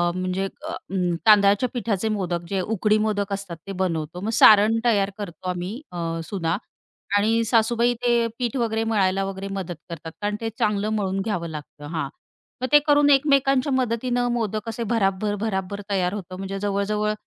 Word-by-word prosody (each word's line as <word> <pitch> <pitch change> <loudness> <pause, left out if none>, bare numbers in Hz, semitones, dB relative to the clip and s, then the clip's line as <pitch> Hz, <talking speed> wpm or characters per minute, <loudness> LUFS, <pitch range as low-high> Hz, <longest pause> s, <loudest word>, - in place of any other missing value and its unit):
म्हणजे 185 +1 -1 0.2
अ - - -4 0.5
तांदळाच्या 205 +2 +5
पिठाचे 220 -4 -1
मोदक 180 -5 -1
जे 195 - 0
उकडी 215 +2 +1
मोदक 210 -2 -1
असतात 195 -4 -5
ते - - -4
बनवतो, 165 -2 -2
मग 210 - -2
सारण 215 +1 +7
तयार 200 -4 +3
करतो 185 -3 -6
आम्ही 180 +8 -4
अ, 175 - -7 0.3
सुना 165 -1 -2 0.6
आणि 225 +3 +2
सासूबाई 235 +1 +3
ते 240 -1 +3
पीठ 240 -1 -1
वगैरे 225 -2 0
मळायला 195 -4 +1
वगैरे 195 0 -5
मदत 185 -3 -4
करतात 165 -1 -7
कारण 205 0 -1
ते 225 - -1
चांगलं 210 0 +1
मळून 195 -2 -1
घ्यावं 195 -5 -2
लागतं. 150 -1 -9
हां, 150 -4 -2 0.5
मग 255 - 0
ते 295 - +8
करून 290 0 +5
एकमेकांच्या 275 -1 +3
मदतीनं 245 -1 0
मोदक 220 -2 -2
असे 225 +1 -4
भराभर-भराभर 200 -1 -1
तयार 185 -2 0
होतं. 185 -3 -6
म्हणजे 195 +1 -5
जवळ-जवळ 205 +1 0
205 Hz, 160 wpm, -24 LUFS, 190-225 Hz, 0.6 s, ते